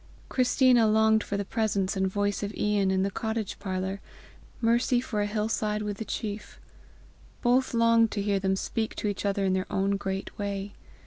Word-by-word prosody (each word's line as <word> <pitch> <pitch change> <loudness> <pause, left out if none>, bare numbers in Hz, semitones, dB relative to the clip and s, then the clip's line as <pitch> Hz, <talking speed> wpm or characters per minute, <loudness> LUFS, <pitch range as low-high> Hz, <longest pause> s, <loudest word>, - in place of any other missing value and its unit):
Christina 250 -2 +4
longed 220 0 +4
for 200 - -3
the 200 - -2
presence 205 -3 0
and 190 0 +1
voice 205 +1 -1
of 205 -1 -3
Ian 205 -2 +1
in 190 0 +2
the 195 - -1
cottage 220 0 -3
parlour, 190 0 -3 0.6
Mercy 240 +2 +2
for 220 -4 -2
a 205 - 0
hill 210 +1 -1
side 210 -1 -1
with 205 -1 -3
the 220 - -5
chief; 210 0 -5 0.8
both 250 0 +2
longed 230 -1 +4
to 205 - -3
hear 200 -1 +1
them 190 0 +1
speak 220 +3 -3
to - - -2
each 205 0 -2
other 200 0 0
in 190 - +2
their 185 0 -2
own 195 +1 +1
great 195 -1 -4
way. 200 0 -3
205 Hz, 190 wpm, -27 LUFS, 195-220 Hz, 0.8 s, Christina